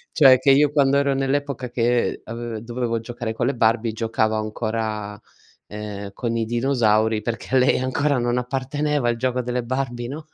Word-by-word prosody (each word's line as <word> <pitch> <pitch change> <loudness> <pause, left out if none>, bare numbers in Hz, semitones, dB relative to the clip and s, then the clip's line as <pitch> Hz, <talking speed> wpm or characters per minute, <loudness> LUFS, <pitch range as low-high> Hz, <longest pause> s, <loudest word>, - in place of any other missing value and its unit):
Cioè 130 -4 +7
che 135 +2 +3
io 145 +2 +5
quando 140 -1 +3
ero 140 -1 +2
nell'epoca 135 -1 -2
che 120 0 0
ave 115 -1 -6
dovevo 115 -1 -2
giocare 115 0 -5
con 115 - -1
le 140 - 0
Barbie 115 -1 +1
giocavo 110 -1 0
ancora, 110 -1 -3 0.5
ehm, 105 -1 -7
con 115 +2 -3
i 115 - 0
dinosauri, 110 -3 +1
perché 115 +3 -4
a - - +6
lei 130 +1 +3
ancora 135 +2 0
non 120 0 0
apparteneva 135 +2 -1
il 120 - +1
gioco 125 +1 -1
delle 125 0 -2
Barbie, 120 -1 -3
no? 150 +4 -7
120 Hz, 175 wpm, -22 LUFS, 115-135 Hz, 0.5 s, Cioè